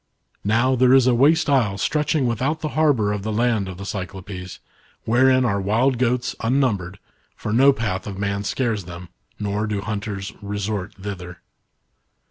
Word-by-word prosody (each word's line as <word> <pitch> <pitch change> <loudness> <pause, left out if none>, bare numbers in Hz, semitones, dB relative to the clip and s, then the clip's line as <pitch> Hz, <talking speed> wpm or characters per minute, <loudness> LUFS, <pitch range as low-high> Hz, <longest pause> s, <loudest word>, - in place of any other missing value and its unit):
Now, 115 +5 +2
there 130 +1 +5
is 130 -2 +5
a 130 - +4
waste 145 +7 +4
isle 120 -9 +2
stretching 150 +4 0
without 130 +7 -1
the 155 - -2
harbour 140 -11 +2
of 105 - -3
the 110 +2 -3
land 110 -3 +1
of 90 - -8
the 100 - -7
Cyclopes, 95 -1 -6 0.5
wherein 130 +2 +4
are 100 -4 0
wild 115 +6 +1
goats 125 0 0
unnumbered, 115 -7 0 0.4
for 105 - -4
no 135 +4 +6
path 105 -7 -3
of 100 -2 -6
man 100 0 -2
scares 110 -4 -1
them, 90 0 -9 0.3
nor 105 +1 -2
do 105 -1 -2
hunters 100 -2 -4
resc/t 100 -1 -4
thither. 90 -3 -7
105 Hz, 160 wpm, -22 LUFS, 100-130 Hz, 0.5 s, no